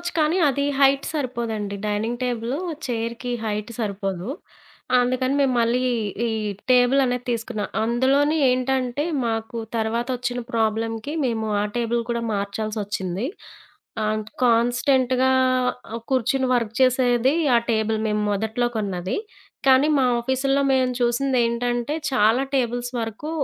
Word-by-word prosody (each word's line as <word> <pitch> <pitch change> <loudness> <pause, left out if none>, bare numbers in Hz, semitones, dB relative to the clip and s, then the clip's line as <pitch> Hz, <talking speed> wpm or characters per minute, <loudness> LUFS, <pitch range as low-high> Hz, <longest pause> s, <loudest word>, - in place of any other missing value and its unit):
చేసుకోవచ్చు 345 0 -3
కానీ 310 +3 +2
అది 280 +1 0
హైట్ 275 0 +4
సరిపోదండి. 230 -8 -3
డైనింగ్ 220 +3 -1
టేబులు 245 +2 -2 0.3
చైర్‌కి 235 0 -3
హైట్ 210 0 -3
సరిపోదు. 195 -2 -3 0.7
అందుకని 255 +2 +1
మేము 265 -2 +2
మళ్ళీ, 235 +2 +2 0.5
ఈ - - 0 0.4
టేబులనేది 250 0 +3
తీసుకున్నాం. 225 -3 -3 0.2
అందులోని 270 +6 +2
ఏంటంటే 255 +1 0 0.2
మాకు 225 0 -3 0.2
తర్వాతొచ్చిన 245 +2 -1
ప్రాబ్లమ్‌కి 225 +3 -1
మేము 225 -3 -1 0.2
ఆ - - 0
టేబుల్ 235 0 0
కూడా 235 0 -1
మార్చాల్సొచ్చింది. 200 -1 -3 0.8
అంటే 215 0 -2
కాన్స్టెంట్‌గా 250 +2 +3 0.6
ఆహ్, 230 - -5
కూర్చొని 260 +1 +1
వర్క్ 230 -2 -1
చేసేది 255 +1 +3 0.2
ఆ - - +6
టేబుల్ 220 -1 +1
మేము 210 0 0
మొదట్లో 220 +4 0
కొన్నది. 190 -4 -2 0.5
కానీ 265 +3 +6
మా 265 - +3 0.2
ఆఫీస్‌‌లో 270 +3 +1
మేము 260 -1 +2
చూసిందేంటంటే 240 +1 +1 0.2
చాలా 230 +2 +3
టేబుల్స్ 245 0 -1
వరకు 225 +7 -5
240 Hz, 115 wpm, -23 LUFS, 220-260 Hz, 0.8 s, ఆ